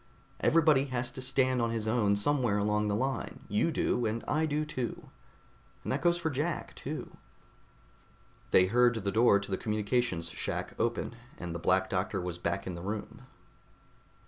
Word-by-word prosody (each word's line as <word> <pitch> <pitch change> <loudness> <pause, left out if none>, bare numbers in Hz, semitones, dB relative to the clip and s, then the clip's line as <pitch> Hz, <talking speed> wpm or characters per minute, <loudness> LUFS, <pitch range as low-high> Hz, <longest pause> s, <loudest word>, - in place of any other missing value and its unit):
Everybody 155 -4 +4
has 125 -2 -2
to 130 - -7
stand 130 -1 +2
on 115 - +1
his 115 -1 -2
own 110 -3 +3
somewhere 120 -1 +1
along 105 +1 +1
the 100 - +1
line. 130 +5 -2
You 105 +10 +1
do, 125 -6 0
and 110 +2 -2
I 155 +2 +1
do, 150 +1 0
too. 130 -5 -5 0.7
And - - -3
that - - 0
goes 175 0 +3
for 160 -2 -2
Jack, 150 +4 -2
too." - - -6 1.3
They 90 - +6
heard 120 +4 +4
the 100 -3 -2
door 110 -1 +5
to 100 0 -7
the 95 - +1
communications 105 -5 -1
shack 75 - -3
open, - - -1 0.2
and 85 -1 -5
the 85 - -4
Black 95 +3 +2
Doctor 95 +1 -1
was 90 -1 -4
back 85 -1 -2
in 95 - -4
the 85 - -7
room. 105 +3 -6
115 Hz, 170 wpm, -30 LUFS, 100-130 Hz, 1.3 s, They